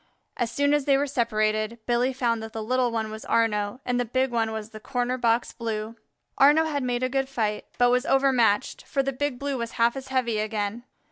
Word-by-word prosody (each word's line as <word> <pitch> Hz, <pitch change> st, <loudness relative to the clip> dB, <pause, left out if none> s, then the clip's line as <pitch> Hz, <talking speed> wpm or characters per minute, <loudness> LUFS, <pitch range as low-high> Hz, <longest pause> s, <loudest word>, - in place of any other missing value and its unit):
As 240 Hz, -2 st, -1 dB
soon 285 Hz, +4 st, +1 dB
as 295 Hz, -2 st, +1 dB
they 275 Hz, -1 st, +4 dB
were 285 Hz, -, +1 dB
separated 215 Hz, -4 st, 0 dB
Billy 245 Hz, +2 st, +2 dB
found 235 Hz, -3 st, 0 dB
that 220 Hz, 0 st, -8 dB
the 220 Hz, -, -4 dB
little 250 Hz, +2 st, +1 dB
one 220 Hz, -2 st, -2 dB
was 220 Hz, 0 st, -7 dB
Arnaux 210 Hz, 0 st, 0 dB
and 250 Hz, 0 st, 0 dB
the -, -, +2 dB
big 255 Hz, +2 st, 0 dB
one 225 Hz, -2 st, 0 dB
was 220 Hz, 0 st, -6 dB
the 215 Hz, -, -9 dB
Corner 245 Hz, +2 st, -1 dB
box 235 Hz, -1 st, +1 dB
Blue. 225 Hz, -1 st, -4 dB, 0.4 s
Arnaux 295 Hz, +4 st, +6 dB
had 295 Hz, -3 st, -1 dB
made 250 Hz, -1 st, -1 dB
a -, -, +3 dB
good 270 Hz, +1 st, -1 dB
fight, 215 Hz, -5 st, -2 dB
but 245 Hz, 0 st, +4 dB
was 250 Hz, 0 st, +1 dB
overmatched, 260 Hz, -4 st, +2 dB
for 275 Hz, -, 0 dB
the 275 Hz, 0 st, -2 dB
Big 280 Hz, 0 st, -2 dB
Blue 280 Hz, -1 st, -3 dB
was 235 Hz, 0 st, -4 dB
half 235 Hz, +2 st, +2 dB
as 270 Hz, 0 st, -7 dB
heavy 250 Hz, -4 st, 0 dB
again. 215 Hz, +2 st, -3 dB
240 Hz, 220 wpm, -26 LUFS, 220-265 Hz, 0.4 s, Arnaux